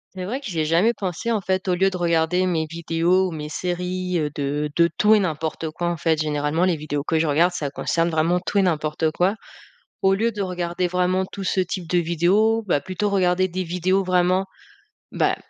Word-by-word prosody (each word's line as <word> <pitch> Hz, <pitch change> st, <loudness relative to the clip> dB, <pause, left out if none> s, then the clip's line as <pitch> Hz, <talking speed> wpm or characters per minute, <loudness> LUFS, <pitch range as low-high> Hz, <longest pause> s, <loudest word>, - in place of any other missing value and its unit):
C'est 185 Hz, -1 st, -5 dB
vrai 240 Hz, +8 st, -3 dB
que -, -, -11 dB
j'y 175 Hz, -7 st, -3 dB
ai 155 Hz, -, +1 dB
jamais 175 Hz, +9 st, +3 dB
pensé, 195 Hz, +3 st, -3 dB
en 215 Hz, -, 0 dB
fait, 190 Hz, +1 st, -1 dB
au 180 Hz, -, +2 dB
lieu 190 Hz, +2 st, +3 dB
de 185 Hz, -, -5 dB
regarder 170 Hz, +1 st, +1 dB
mes 165 Hz, -3 st, 0 dB
vidéos 170 Hz, +3 st, +1 dB
ou, -, -, -8 dB
mes 150 Hz, -1 st, -6 dB
séries, 180 Hz, +1 st, -2 dB
heu, 150 Hz, -1 st, -1 dB
de 145 Hz, +1 st, -2 dB
de 170 Hz, 0 st, +5 dB
tout 215 Hz, +1 st, +6 dB
et -, -, +4 dB
n'importe 160 Hz, -3 st, -3 dB
quoi, 175 Hz, +2 st, -3 dB
en 175 Hz, -, -1 dB
fait, 160 Hz, -2 st, +1 dB
généralement 150 Hz, +2 st, 0 dB
les 180 Hz, -2 st, +2 dB
vidéos 145 Hz, -2 st, -3 dB
que 160 Hz, +2 st, 0 dB
je 160 Hz, -, +2 dB
regarde, 160 Hz, +4 st, +3 dB
ça 150 Hz, -6 st, -4 dB
concerne 165 Hz, +4 st, 0 dB
vraiment 165 Hz, +3 st, +2 dB
tout 195 Hz, +3 st, -1 dB
et -, -, +5 dB
n'importe 155 Hz, -3 st, 0 dB
quoi. 180 Hz, +5 st, +1 dB, 0.7 s
Au 190 Hz, 0 st, +4 dB
lieu 225 Hz, +4 st, +1 dB
de 205 Hz, -, -5 dB
regarder 180 Hz, -1 st, -2 dB
vraiment 180 Hz, +1 st, +1 dB
tout 195 Hz, +1 st, -8 dB
ce 190 Hz, -, 0 dB
type 180 Hz, -2 st, -3 dB
de 180 Hz, -, +2 dB
vidéos, 180 Hz, +7 st, +2 dB
bah, 160 Hz, -, +2 dB
plutôt 190 Hz, +7 st, -2 dB
regarder 185 Hz, -1 st, +2 dB
des 185 Hz, +1 st, -3 dB
vidéos 180 Hz, +3 st, +1 dB
vraiment, 185 Hz, +1 st, +2 dB, 0.7 s
bah, -, -, +1 dB
180 Hz, 220 wpm, -22 LUFS, 160-185 Hz, 0.7 s, tout